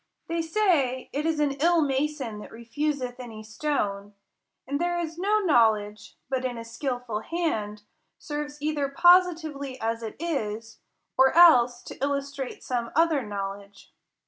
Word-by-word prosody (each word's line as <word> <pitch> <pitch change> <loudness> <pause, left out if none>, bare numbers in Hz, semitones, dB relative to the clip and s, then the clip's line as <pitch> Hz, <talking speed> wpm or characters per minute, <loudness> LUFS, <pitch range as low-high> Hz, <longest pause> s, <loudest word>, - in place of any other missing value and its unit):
They 335 0 -1
say, 320 -8 +1
it 300 +3 -1
is 320 -2 0
an 295 -2 +2
ill 340 +2 +4
mason 270 -5 -2
that - - -10
refuseth 250 +2 -3
any 225 -3 -8
stone: 210 -5 -3 0.5
and 285 +3 -2
there 350 0 0
is 335 -1 -4
no 420 +3 +2
knowledge, 220 - +2
but, 260 0 -2
in 250 -2 -2
a 230 - -7
skilful 245 -2 -3
hand, 215 -8 -3 0.3
serves 295 -1 -5
either 295 -2 0
positively 315 -5 +3
as 225 +1 -2
it 220 -1 -6
is, 225 -9 -3 0.4
or 265 0 +7
else 245 -8 +6
to - - -8
illustrate 280 -1 -3
some 240 -2 -2
other 325 -3 +3
know 200 -3 -3
ledge. 200 0 -18
275 Hz, 145 wpm, -26 LUFS, 230-315 Hz, 0.5 s, or